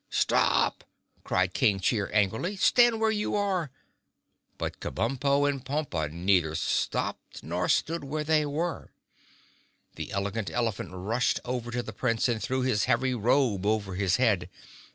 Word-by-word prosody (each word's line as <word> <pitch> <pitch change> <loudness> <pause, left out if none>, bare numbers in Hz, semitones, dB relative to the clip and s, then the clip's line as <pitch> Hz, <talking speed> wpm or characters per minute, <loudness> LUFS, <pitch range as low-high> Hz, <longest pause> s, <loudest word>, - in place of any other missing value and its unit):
"Stop!" - - +2 0.4
cried 95 -1 0
King 105 -7 +2
Cheer 100 +1 0
angrily. 110 - 0
"Stand 240 +3 +4
where 220 0 +2
you 210 -1 -1
are!" 190 -6 0 0.9
But - - -4
Kabumpo 135 - 0
and 140 -2 -2
Pompa 135 - -2
neither 85 -2 +1
stopped 85 - -2
nor 90 +3 -2
stood 165 -1 +1
where 150 +2 -3
they 155 0 +2
were. 155 +3 -3 1.1
The - - -5
Elegant 100 +2 -2
Elephant 115 -4 -2
rushed 105 +7 0
over 125 -1 -3
to 120 0 -2
the 110 - -8
Prince 115 +4 0
and 115 -3 -1
threw 130 0 -1
his 120 -6 +1
heavy 130 +2 +1
robe 120 -3 +2
over 105 -3 0
his 95 0 +1
head. 105 -8 +1
120 Hz, 145 wpm, -28 LUFS, 100-145 Hz, 1.1 s, Stand